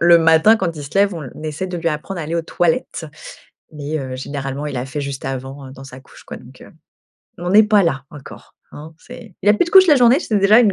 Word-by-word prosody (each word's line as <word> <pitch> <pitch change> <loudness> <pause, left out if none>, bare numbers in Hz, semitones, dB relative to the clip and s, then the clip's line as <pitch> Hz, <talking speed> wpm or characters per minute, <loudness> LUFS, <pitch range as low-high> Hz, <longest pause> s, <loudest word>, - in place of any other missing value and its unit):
le 170 0 +6
matin 165 +7 +4
quand 170 -5 -3
il 150 - -7
se 140 - -10
lève, 200 -1 +2
on 165 - -7
l 130 - -9
naissait 155 +4 -5
de 180 - -5
lui 170 0 -1
apprendre 165 +4 -5
à 155 - -5
aller 165 +2 -4
aux 165 - -1
toilettes. 165 -1 -2 0.7
Mais, 150 +1 -5
heu, 130 -2 -6
généralement, 140 +1 -5
il 140 - -5
a 125 +1 -4
fait 145 +2 -5
juste 140 -1 -6
avant, 135 +1 -6
heu, 130 - -12
dans 135 0 -12
sa 130 -1 -12
couche 130 - -18
quoi - - -9
donc, - - -16
heu, - - -14 0.7
on 175 - -7
en 180 - -1
est 215 - +8
pas 210 -1 +3
là 135 -4 -2
encore, 145 -2 -13 0.2
hein, 155 +2 -11
c'est 240 -5 -13
il 205 - +1
a 210 - +6
plus 210 - +1
de - - -7
couches 375 0 +7
la 295 - +6
journée, 245 +2 +5
c'est 215 -11 -2
déjà 200 +3 +5
une 210 -5 +3
160 Hz, 275 wpm, -18 LUFS, 140-195 Hz, 0.7 s, est